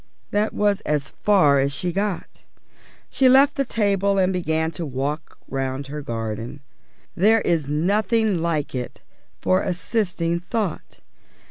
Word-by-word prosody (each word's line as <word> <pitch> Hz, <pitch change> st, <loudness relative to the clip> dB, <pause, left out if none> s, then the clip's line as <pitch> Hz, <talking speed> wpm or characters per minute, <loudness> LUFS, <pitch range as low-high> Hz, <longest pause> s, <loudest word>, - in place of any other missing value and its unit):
_ -, -, -35 dB, 0.3 s
This 210 Hz, +1 st, +1 dB
was 205 Hz, 0 st, +1 dB
as 145 Hz, -2 st, -2 dB
far 155 Hz, -9 st, +3 dB
as 140 Hz, +1 st, +1 dB
she 175 Hz, +6 st, -3 dB
had 170 Hz, -, -6 dB
got. 200 Hz, -2 st, -3 dB, 0.7 s
She 260 Hz, -1 st, +4 dB
left 275 Hz, +3 st, +6 dB
the 275 Hz, -, +1 dB
table 200 Hz, -4 st, +1 dB
and 190 Hz, 0 st, +2 dB
began 160 Hz, -2 st, 0 dB
to 165 Hz, +2 st, -6 dB
walk 145 Hz, +2 st, -4 dB
round 135 Hz, +1 st, -3 dB
her 150 Hz, -, -4 dB
garden. 115 Hz, +1 st, -5 dB, 0.5 s
There 220 Hz, +5 st, +4 dB
is 165 Hz, -7 st, 0 dB
nothing 200 Hz, +5 st, +1 dB
like 160 Hz, -4 st, -1 dB
it 125 Hz, -2 st, -5 dB, 0.4 s
for 185 Hz, +1 st, +2 dB
assisting 175 Hz, -3 st, -1 dB
thought. 185 Hz, 0 st, -4 dB
175 Hz, 145 wpm, -23 LUFS, 145-205 Hz, 0.7 s, left